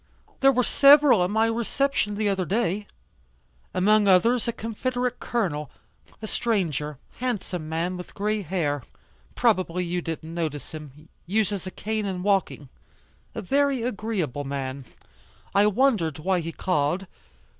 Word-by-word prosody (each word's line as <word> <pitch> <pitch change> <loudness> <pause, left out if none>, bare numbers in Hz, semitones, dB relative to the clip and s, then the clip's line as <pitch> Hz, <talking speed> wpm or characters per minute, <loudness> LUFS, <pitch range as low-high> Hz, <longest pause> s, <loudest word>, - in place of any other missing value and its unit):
There 270 0 +6
were 250 -1 +2
several 280 -6 +6
at 180 - 0
my 220 +2 +2
reception 230 0 0
the 210 0 0
other 195 -2 +1
day. 205 +1 -1 0.8
Among 210 +2 +3
others 225 +7 +4
a - - +2
confederate 245 +2 -3
Colonel 160 - -2 0.5
a - - -1
stranger 165 - -1 0.2
handsome 195 -10 -3
man 170 +3 -2
with 180 - -10
gray 210 +1 -1
hair, 155 -6 -1 0.5
probably 185 -6 +1
you 175 +1 -2
didn't 165 0 -6
notice 155 -4 -4
him, 155 -1 -10 0.2
uses 200 -1 0
a - - -2
cane 215 +2 -3
in 180 -2 -3
walking. 195 -7 0 0.7
A - - -4
very 275 +3 +1
agreeable 205 - -2
man. 135 -1 -4 0.7
I 200 +1 +5
wondered 210 - +2
why 185 +4 0
he 165 0 -4
called. 175 +1 0
195 Hz, 135 wpm, -25 LUFS, 165-225 Hz, 0.8 s, There